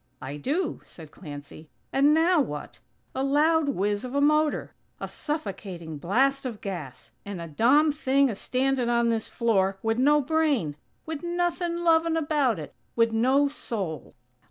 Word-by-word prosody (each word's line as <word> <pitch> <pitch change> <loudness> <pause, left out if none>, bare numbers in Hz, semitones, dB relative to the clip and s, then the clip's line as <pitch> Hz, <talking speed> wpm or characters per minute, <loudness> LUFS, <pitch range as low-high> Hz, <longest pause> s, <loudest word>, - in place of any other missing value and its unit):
"I 140 +3 -6
do," 300 - -2
said 160 -3 -13
Clancy. 150 -1 -10 0.2
"And 280 +2 +5
now 325 +1 +4
what? 150 - -5 0.3
A 265 - -1
loud 300 +3 +3
whizz 205 -4 -1
of 255 +1 -6
a - - +3
motor! 305 +1 +2 0.3
A - - -4
suffocating 190 - -5
blast 270 - +1
of 240 -5 -5
gas! 150 -10 -7
and 200 -3 -6
a 170 - -5
dom 265 - +4
thing 275 -1 +2
a 240 - -2
standin' 255 +3 0
on 235 -1 +2
this 225 -1 -1
floor, 195 -5 +1
wid 225 +1 0
no 295 +3 +5
brain; 285 - +1 0.3
wid 315 -2 -5
nothin' 345 0 -1
lovin' 325 -1 +3
about 290 - +1
it. 150 -2 -8 0.2
Wid 230 -1 +3
no 260 +5 +3
soul." 195 - -5
260 Hz, 155 wpm, -26 LUFS, 195-300 Hz, 0.3 s, And